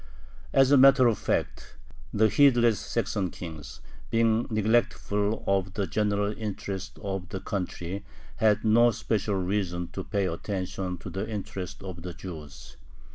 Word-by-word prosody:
As 135 0 +4
a 145 - +7
matter 135 -1 +7
of 115 -3 +3
fact, - - -2 0.4
the 110 +1 +4
heedless 120 -4 +4
"Saxon 105 -4 -1
kings," 80 -4 -9 0.3
being 115 0 +2
neglectful 110 -1 +1
of 95 -1 0
the 100 - 0
general 105 0 0
interests 100 -3 -5
of 95 -3 -4
the 95 - -4
country, 95 0 -4 0.3
had 105 -1 +3
no 120 +2 +6
special 110 -2 -1
reason 90 -2 -1
to 95 - -5
pay 100 0 -1
attention 90 +1 -3
to - - -8
the 95 +3 -4
interests 95 -4 -6
of 90 -3 -7
the 90 0 -7
Jews. 75 -7 -10
100 Hz, 140 wpm, -27 LUFS, 95-110 Hz, 0.4 s, a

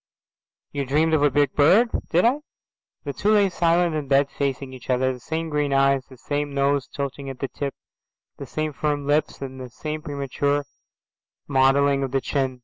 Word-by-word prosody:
"You 140 -1 -2
dreamed 155 +4 +1
of 155 - +3
a 145 - +5
big 140 0 +2
bird." 195 +11 +5 0.2
"Did 175 +5 +3
I?" 255 +5 +3 0.6
The 140 - -4
two 210 +7 +1
lay 200 -2 +4
silent 170 0 +2
in 150 -2 -3
bed 140 +1 +3
facing 135 -1 -3
each 130 -1 -12
other, 130 +1 +2
the 125 - -10
same 160 +5 -3
green 150 -2 0
eyes, 135 -1 +3
the 130 - -15
same 145 +2 -3
nose 140 -1 +1
tilting 140 0 -5
at 135 - -7
the 135 - -3
tip, 140 -1 -4 0.6
the - - -8
same 155 -1 -3
firm 145 0 -1
lips, 145 0 0
and 130 -1 -7
the 125 - -7
same 155 +5 -5
premature 145 -1 -1 0.8
modelling 140 +1 +3
of 135 - -1
the 135 - +3
chin. 130 -3 -1
140 Hz, 190 wpm, -23 LUFS, 135-155 Hz, 0.8 s, a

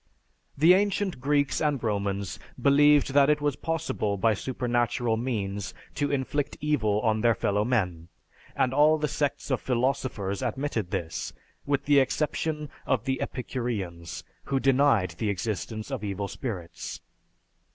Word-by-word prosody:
The 160 +5 +7
ancient 195 -3 +1
Greeks 145 0 +1
and 150 -2 +2
Romans 100 -2 -2 0.2
believed 145 0 +5
that 140 0 +5
it 150 0 +3
was 145 -2 0
possible 160 -11 -2
by 110 +3 +3
supernatural 120 0 0
means 105 -5 -3 0.2
to 145 - -1
inflict 140 +1 -1
evil 110 -9 +1
on 110 -1 +1
their 115 -1 +4
fellowmen, 100 -6 0 0.5
and 130 - +1
all 150 +3 +5
the 150 0 0
sects 145 0 -2
of 130 - +1
philosophers 120 -5 -1
admitted 125 -5 -2
this, 80 -2 -3 0.3
with 140 0 0
the 145 -1 +5
exception 150 +2 -1 0.2
of 125 -4 +1
the 130 0 -1
Epicureans, 105 -10 -4 0.2
who 135 - 0
denied 135 -9 +3
the 110 - 0
existence 110 - -3
of 130 -6 -3
evil 100 0 -3
spirits. 100 -8 -6
125 Hz, 135 wpm, -27 LUFS, 105-145 Hz, 0.5 s, The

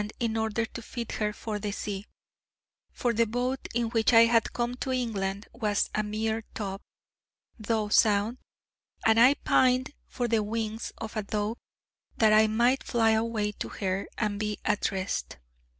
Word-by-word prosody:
in 230 -2 -1
order 220 0 0
to 235 - -8
fit 235 0 -6
her 210 -1 0
for 210 0 -5
the 205 0 -3
sea: 200 0 -5 0.8
for 240 -1 -1
the 230 0 +2
boat 250 +4 -2
in 235 -1 +1
which 225 0 +2
I 230 - +9
had 230 -1 +2
come 240 0 -1
to 260 - -3
England 205 -5 -2
was 210 -4 0
a 215 - +1
mere 220 +1 -2
tub, 195 -2 -4 0.8
though 215 0 0
sound, 210 +3 +3 0.7
and 225 0 +5
I 255 +4 +7
pined 255 +1 +2
for 245 - -2
the 225 -1 +2
wings 220 +1 -3
of 220 -1 -7
a 215 - 0
dove, 210 +2 -2 0.6
that 220 -2 +5
I 215 0 +6
might 240 +5 +2
fly 225 -2 +2
away 220 -1 0
to - - -6
her, 195 0 -2
and 210 -2 -1
be 210 -1 -2
at 210 -1 +1
rest. 190 - -3
220 Hz, 165 wpm, -28 LUFS, 210-235 Hz, 0.8 s, I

